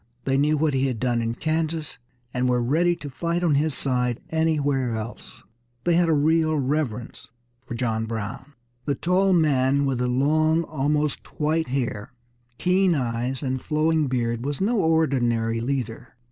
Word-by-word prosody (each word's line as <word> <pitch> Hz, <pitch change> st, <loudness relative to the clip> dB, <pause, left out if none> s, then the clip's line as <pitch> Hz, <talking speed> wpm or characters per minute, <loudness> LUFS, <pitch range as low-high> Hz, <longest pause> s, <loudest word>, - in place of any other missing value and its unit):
They 135 Hz, +1 st, 0 dB
knew 150 Hz, +2 st, +2 dB
what 150 Hz, -1 st, +1 dB
he 135 Hz, 0 st, +1 dB
had 125 Hz, -4 st, -3 dB
done 120 Hz, -1 st, 0 dB
in 115 Hz, 0 st, -2 dB
Kansas, 160 Hz, +1 st, -2 dB, 0.3 s
and 125 Hz, 0 st, +1 dB
were 125 Hz, 0 st, +2 dB
ready 165 Hz, +9 st, +2 dB
to 165 Hz, -4 st, -9 dB
fight 170 Hz, +5 st, -2 dB
on 165 Hz, -4 st, +3 dB
his 145 Hz, 0 st, +1 dB
side 125 Hz, -3 st, 0 dB
anywhere 145 Hz, -6 st, +1 dB
else. 110 Hz, +2 st, -8 dB, 0.4 s
They 175 Hz, -, +2 dB
had 170 Hz, 0 st, +3 dB
a -, -, +4 dB
real 155 Hz, +1 st, +2 dB
reverence 130 Hz, -4 st, -2 dB, 0.4 s
for 120 Hz, -, -5 dB
John 110 Hz, -2 st, -1 dB
Brown. 115 Hz, +5 st, -5 dB, 0.3 s
The 140 Hz, -, 0 dB
tall 185 Hz, +6 st, +2 dB
man 140 Hz, -5 st, +3 dB
with 135 Hz, -3 st, -1 dB
the 125 Hz, -, 0 dB
long, 155 Hz, +6 st, +2 dB
almost 150 Hz, -1 st, -2 dB
white 160 Hz, +1 st, +1 dB
hair, 125 Hz, -5 st, -3 dB, 0.4 s
keen 185 Hz, -1 st, +2 dB
eyes, 125 Hz, +1 st, -2 dB
and 130 Hz, -1 st, -2 dB
flowing 155 Hz, 0 st, +1 dB
beard 120 Hz, -2 st, -1 dB
was 145 Hz, +1 st, -3 dB
no 225 Hz, +5 st, +1 dB
ordinary 120 Hz, -9 st, +1 dB
leader. 120 Hz, -2 st, -4 dB
140 Hz, 160 wpm, -24 LUFS, 125-160 Hz, 0.4 s, a